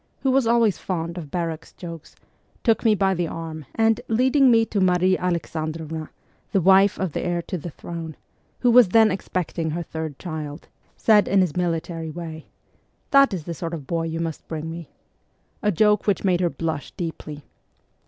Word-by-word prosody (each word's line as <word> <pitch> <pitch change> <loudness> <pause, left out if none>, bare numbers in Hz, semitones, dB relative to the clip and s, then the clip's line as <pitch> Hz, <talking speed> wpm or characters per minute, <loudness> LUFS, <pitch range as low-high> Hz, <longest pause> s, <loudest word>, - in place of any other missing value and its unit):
who 265 - +2
was 260 -2 +3
always 230 -4 +3
fond 170 -2 -3
of 165 -5 -7
barrack 165 0 -4
jokes, 165 -3 -9 0.5
took 225 -3 +2
me 220 -2 +4
by 195 -1 +2
the 175 -2 -1
arm, 160 -3 -7
and, 225 -1 +2
leading 260 +4 +4
me 225 -1 +5
to 205 -3 -1
Marie 185 0 +3
Alexandrovna 160 -3 -3 0.4
(the 195 - +4
wife 190 +2 +5
of 185 -3 -2
the - - -3
heir 175 -1 -1
to 185 - -5
the 175 0 -5
throne), 165 0 -7 0.5
who 245 - +4
was 240 -4 +7
then 220 +2 +5
expecting 180 -3 -3
her 170 +3 -3
third 160 -3 -6
child, 155 -3 -6 0.3
said 210 -2 +4
in 195 - +3
his 175 -5 0
military 165 -2 -2
way, 160 -1 -7 0.3
' - - -43
That 275 -2 +6
is 180 -5 -4
the 170 - -5
sort 165 +1 -4
of 150 -4 -8
boy 165 +2 -1
you 165 0 -3
must 165 -2 -4
bring 160 0 -5
me' 170 -1 -8 0.7
a 210 -3 +2
joke 210 +3 +3
which 200 -4 +1
made 180 -2 +2
her 175 - +2
blush 160 -3 -4
deeply. 155 -3 -6
175 Hz, 185 wpm, -23 LUFS, 160-200 Hz, 0.7 s, was